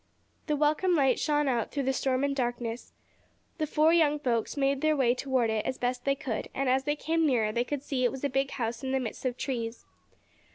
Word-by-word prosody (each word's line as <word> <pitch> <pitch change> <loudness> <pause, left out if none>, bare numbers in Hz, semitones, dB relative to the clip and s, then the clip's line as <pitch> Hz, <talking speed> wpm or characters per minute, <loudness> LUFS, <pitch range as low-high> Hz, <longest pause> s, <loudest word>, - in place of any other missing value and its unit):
The 300 - +1
welcome 305 +5 +2
light 270 -5 +3
shone 295 -1 +1
out 240 -4 0
through 280 - -2
the 265 +1 +1
storm 260 0 0
and 280 0 0
darkness. 240 -2 -3 0.7
The 310 - 0
four 310 +2 +3
young 305 -3 +4
folks 245 -3 -1
made 275 0 +1
their 310 0 +3
way 245 -3 +3
toward 255 -3 0
it 220 -1 0
as 260 - -3
best 245 0 -2
they 275 0 +2
could, 270 -6 -4
and, 275 0 -1
as 260 +1 +2
they 295 0 +1
came 320 +1 +1
nearer 225 -6 +2
they 235 +2 0
could 285 +2 -4
see 275 -3 -3
that 255 - +2
it 245 - +2
was 265 0 -8
a - - +3
big 270 +1 0
house 230 -1 -4
in 265 0 -2
the 265 - +2
midst 245 0 -6
of 250 -1 -1
trees. 235 -4 -4
265 Hz, 240 wpm, -29 LUFS, 245-290 Hz, 0.7 s, young